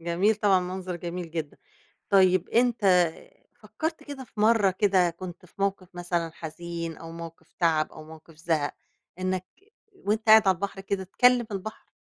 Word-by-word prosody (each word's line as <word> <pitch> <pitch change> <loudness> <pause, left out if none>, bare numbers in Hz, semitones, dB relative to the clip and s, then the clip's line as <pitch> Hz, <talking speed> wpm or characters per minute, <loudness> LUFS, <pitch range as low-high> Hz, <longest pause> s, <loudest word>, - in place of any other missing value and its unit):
جميل 175 +6 +2
طبعًا 200 -3 +3
منظر 180 0 -5
جميل 175 0 -6
جدًا. 160 -3 -5 0.5
طيب 185 -2 +4
أنت 200 -8 +3 0.5
فكّرت 320 0 -4
كده 280 -3 -8
في 215 - -9
مرّة 215 -3 +4
كده 185 -2 +2
كنت 180 +1 -9
في - - -26
موقِف 195 -2 -1
مثلًا 175 -1 -2
حزين 170 0 -6
أو 165 0 -10
موقف 165 0 -10
تعَب 160 -3 +2
أو 155 - -11
موقِف 160 0 -14
زهَق 160 -2 -1 0.4
إنك 185 0 -2 0.5
وأنت 220 - -2
قاعد 220 -2 +8
على 190 - +5
البحر 195 +2 -5
كده 195 0 -3
تكلّم 245 +4 +3
البحر؟ 205 +3 -6
185 Hz, 155 wpm, -27 LUFS, 170-200 Hz, 0.5 s, قاعد